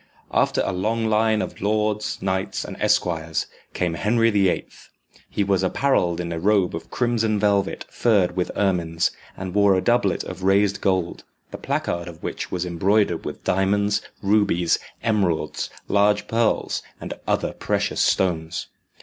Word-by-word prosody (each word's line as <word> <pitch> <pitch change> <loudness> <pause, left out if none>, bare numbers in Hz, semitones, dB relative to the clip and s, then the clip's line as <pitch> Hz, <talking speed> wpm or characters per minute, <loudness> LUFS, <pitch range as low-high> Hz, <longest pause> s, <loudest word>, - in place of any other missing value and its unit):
After - - +2
a - - 0
long 110 +5 -1
line 110 0 +2
of - - -8
lords, 105 0 -1
knights, 95 0 -1
and - - -7
esquires, 80 -2 +1 0.3
came 90 -2 0
Henry 115 +6 +2
the 100 -3 +3
Eighth. - - -5 0.4
He 100 - 0
was 100 -2 +1
apparelled 95 -4 +1
in 85 -1 -3
a 85 - -3
robe 100 0 +2
of 80 0 -7
crimson 115 -3 +1
velvet 100 -1 +1
furred 100 -7 +2
with 90 -1 -1
ermines, 85 -4 +1 0.3
and 95 -1 -5
wore 100 -1 +4
a - - +2
doublet 120 -4 +2
of 90 0 -8
raised 100 +1 +2
gold, 95 -3 0 0.3
the - - -7
placard 85 0 -2
of 85 -2 -11
which - - -4
was 90 -1 -2
embroidered 95 +1 +1
with - - -6
diamonds, 100 +2 +1 0.2
rubies, 100 -4 +2 0.2
emeralds, 90 -9 0 0.2
large 105 +1 +2
pearls, 115 0 0 0.2
and - - -5
other - - 0
precious - - -1
stones. 85 -3 0
95 Hz, 150 wpm, -23 LUFS, 90-105 Hz, 0.4 s, wore